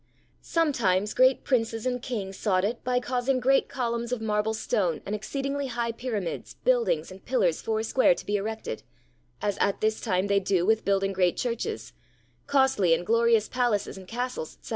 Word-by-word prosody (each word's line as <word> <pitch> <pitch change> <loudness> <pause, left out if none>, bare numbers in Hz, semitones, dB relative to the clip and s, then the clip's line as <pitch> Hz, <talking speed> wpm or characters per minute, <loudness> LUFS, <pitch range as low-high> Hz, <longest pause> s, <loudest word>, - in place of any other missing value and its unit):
Sometimes 215 - +1
great 260 +1 +4
Princes 225 -3 0
and 250 -1 -1
Kings 205 -7 -4
sought 185 -2 +1
it 230 +3 -3
by 250 0 +1
causing 250 +1 0
great 270 +2 +3
columns 235 -2 -2
of 250 - -1
marble 215 0 0
stone 185 -6 0
and 200 - -4
exceedingly 275 +6 -3
high 235 -1 -2
pyramids, 225 -6 -4
buildings, - - +2
and 190 +1 -12
pillars 200 -11 +1
four 220 0 -1
square 260 +4 +3
to - - -9
be 205 - -1
erected, 215 - -3 0.6
as 205 -1 -1
at 200 - +1
this 215 0 0
time 185 -4 0
they 200 0 +3
do 185 -2 +1
with 220 +2 +2
building 195 0 +1
great 180 -2 +2
churches, 245 - -3 0.5
costly 265 -11 +3
and 175 - -5
glorious 230 0 +3
palaces 240 -5 0
and 190 -1 -11
castles, 250 - -4
etc. - - -13
225 Hz, 175 wpm, -27 LUFS, 200-255 Hz, 0.6 s, great